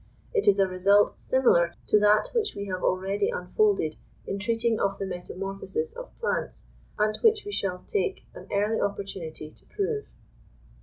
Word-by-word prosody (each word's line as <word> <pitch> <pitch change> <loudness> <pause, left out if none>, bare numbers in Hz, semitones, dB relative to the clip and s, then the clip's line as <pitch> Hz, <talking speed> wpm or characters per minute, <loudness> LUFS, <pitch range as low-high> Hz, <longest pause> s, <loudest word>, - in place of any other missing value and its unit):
It 430 -3 +2
is 200 - +6
a 195 -1 +4
result 195 +3 +3
similar 175 -10 +3
to 210 - +4
that 210 +1 +4
which 455 -3 0
we 200 - -4
have 185 -2 -4
already 195 - +1
unfolded 425 - +1 0.3
in 195 - -3
treating 230 +1 0
of 195 0 0
the 195 - -3
metamorphosis 195 - -4
of - - -10
plants, 475 - -2 0.3
and 215 0 +2
which 440 -2 +4
we 410 - -5
shall 185 - -2
take 415 -1 -1
an - - -11
early 210 +2 +1
opportunity 190 -6 -4
to - - -20
prove. 425 +1 -2
205 Hz, 160 wpm, -27 LUFS, -, 0.3 s, is